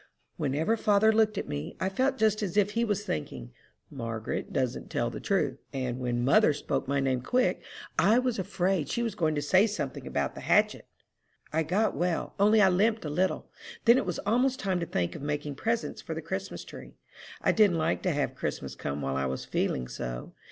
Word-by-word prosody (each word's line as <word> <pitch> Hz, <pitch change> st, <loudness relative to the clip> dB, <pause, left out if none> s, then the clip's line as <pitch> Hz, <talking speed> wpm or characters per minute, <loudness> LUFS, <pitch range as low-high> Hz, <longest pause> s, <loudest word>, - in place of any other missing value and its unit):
"Whenever 155 Hz, +7 st, 0 dB
father 215 Hz, 0 st, +4 dB
looked 215 Hz, -1 st, +3 dB
at -, -, -3 dB
me, 75 Hz, +1 st, -5 dB
I 190 Hz, -, 0 dB
felt 260 Hz, +8 st, +1 dB
just 215 Hz, -1 st, +2 dB
as 200 Hz, -2 st, -2 dB
if 205 Hz, 0 st, +3 dB
he 230 Hz, +2 st, 0 dB
was 205 Hz, -3 st, 0 dB
thinking, 65 Hz, -5 st, -4 dB, 0.4 s
'Margaret 115 Hz, -4 st, -4 dB
doesn't 130 Hz, -2 st, -2 dB
tell 120 Hz, 0 st, -1 dB
the -, -, -6 dB
truth;' 155 Hz, -9 st, 0 dB
and 130 Hz, -2 st, -2 dB
when 120 Hz, -1 st, -1 dB
mother 155 Hz, -, +5 dB
spoke 145 Hz, -, -2 dB
my 140 Hz, 0 st, +1 dB
name 130 Hz, -2 st, 0 dB
quick, 250 Hz, -, +1 dB, 0.4 s
I 215 Hz, +4 st, +5 dB
was 250 Hz, -3 st, 0 dB
afraid 185 Hz, -4 st, 0 dB
she 235 Hz, -, -1 dB
was 230 Hz, -, -1 dB
going 155 Hz, -2 st, 0 dB
to 145 Hz, -, -1 dB
say 190 Hz, +8 st, +4 dB
something 210 Hz, 0 st, -4 dB
about -, -, -1 dB
the -, -, -9 dB
hatchet." -, -, +2 dB, 0.7 s
"I 160 Hz, -, +2 dB
got 190 Hz, +7 st, +1 dB
well, 175 Hz, -1 st, -1 dB
only 210 Hz, +1 st, +5 dB
I 190 Hz, -, +6 dB
limped 215 Hz, +3 st, +2 dB
a 150 Hz, -, -3 dB
little. 185 Hz, +5 st, -1 dB, 0.3 s
Then 235 Hz, +2 st, +7 dB
it -, -, -3 dB
was 180 Hz, -, -2 dB
almost 250 Hz, +4 st, +2 dB
time 190 Hz, -3 st, 0 dB
to 170 Hz, -, -3 dB
think 90 Hz, -, -1 dB
of 155 Hz, -, -8 dB
making 145 Hz, 0 st, -3 dB
presents 230 Hz, +11 st, -2 dB
for -, -, -5 dB
the -, -, -4 dB
Christmas -, -, -5 dB
tree. -, -, -11 dB, 0.5 s
I -, -, +4 dB
didn't 205 Hz, -6 st, +4 dB
like 160 Hz, +1 st, 0 dB
to 180 Hz, -, +1 dB
have 145 Hz, -2 st, -1 dB
Christmas -, -, -4 dB
come 70 Hz, 0 st, -4 dB
while 70 Hz, 0 st, -1 dB
I 70 Hz, 0 st, 0 dB
was 65 Hz, 0 st, -4 dB
feeling 60 Hz, -1 st, -1 dB
so. 60 Hz, 0 st, -6 dB
180 Hz, 210 wpm, -29 LUFS, 130-215 Hz, 0.7 s, Then